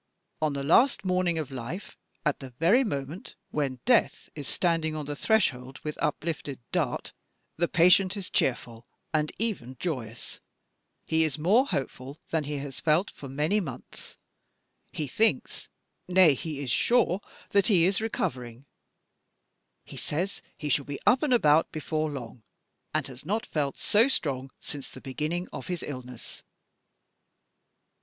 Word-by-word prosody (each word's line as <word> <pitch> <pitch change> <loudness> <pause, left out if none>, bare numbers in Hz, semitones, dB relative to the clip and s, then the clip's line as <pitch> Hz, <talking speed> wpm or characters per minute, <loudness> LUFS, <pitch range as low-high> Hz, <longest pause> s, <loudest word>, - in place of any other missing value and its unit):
On 155 -2 +1
the 140 0 -3
last 215 - +4
morning 180 -2 +2
of 150 -4 -3
life, 135 - -6 0.3
at 150 - +1
the 135 - -8
very 170 - +4
moment 155 - -4 0.2
when 135 -4 -1
Death 240 -3 +2
is 145 -3 -7
standing 165 -3 +1
on 150 -1 -4
the 145 +1 -4
threshold 135 - +1
with 150 0 -3
uplifted 150 -4 -2
dart, - - -1 0.4
the 170 +1 +2
patient 180 +4 +5
is 190 -2 -6
cheerful 120 -2 0 0.3
and 155 -1 +1
even 155 - -2
joyous: 120 -10 -4 0.7
he 160 0 +3
is 155 -3 0
more 205 - +4
hopeful 135 - -4
than 160 -2 +1
he 145 0 -3
has 140 -1 -5
felt 165 +5 +2
for 140 - -10
many 150 +10 +1
months: 135 - -8 0.7
he 155 - -3
thinks 220 - 0 0.4
nay, 180 -4 +6
he 145 +1 -5
is 130 -4 -2
sure 210 - +3 0.3
that 200 -1 +4
he 180 -7 +5
is 195 +3 +2
recovering: 125 - -3 1.2
he - - -11
says 180 +7 -2 0.2
he 150 - -4
shall 145 -1 +2
be 145 0 -5
up 255 - +5
and 300 - +1
about 160 -9 +4
before 155 0 -1
long: 125 -4 -7 0.6
he - - -4
has 130 -1 -9
not 215 +8 -1
felt 145 -3 -2
so 220 +4 +4
strong 135 - -1
since 145 -2 -5
the - - -11
beginning 155 +7 -3
of - - -6
his 180 -2 -3
illness. 125 -3 -8
155 Hz, 150 wpm, -28 LUFS, 135-185 Hz, 1.2 s, nay